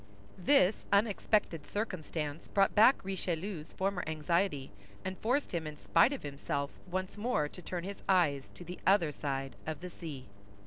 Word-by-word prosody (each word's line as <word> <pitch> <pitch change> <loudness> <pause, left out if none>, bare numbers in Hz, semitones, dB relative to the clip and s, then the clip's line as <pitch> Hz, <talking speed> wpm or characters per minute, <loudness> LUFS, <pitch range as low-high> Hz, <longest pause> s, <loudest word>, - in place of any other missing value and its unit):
This 195 -1 +4
unexpected 200 -5 +2
circumstance 165 -7 -3
brought 195 -1 +3
back 225 +1 +6
Richelieu's 185 -3 -3
former 190 -1 -1
anxiety, 160 -1 0 0.3
and 190 0 -2
forced 255 +6 +1
him 165 -3 -1
in 150 0 -7
spite 165 +10 +4
of 280 - -4
himself 140 0 -3 0.2
once 185 +2 -3
more 210 -10 +1
to 180 - -11
turn 175 0 -4
his 200 +2 -6
eyes 150 -8 +3
to - - -9
the 180 +1 -8
other 185 -6 +5
side 135 -3 -3
of 155 -2 -3
the 180 0 -6
sea. 150 -7 -7
175 Hz, 160 wpm, -32 LUFS, 150-195 Hz, 0.3 s, back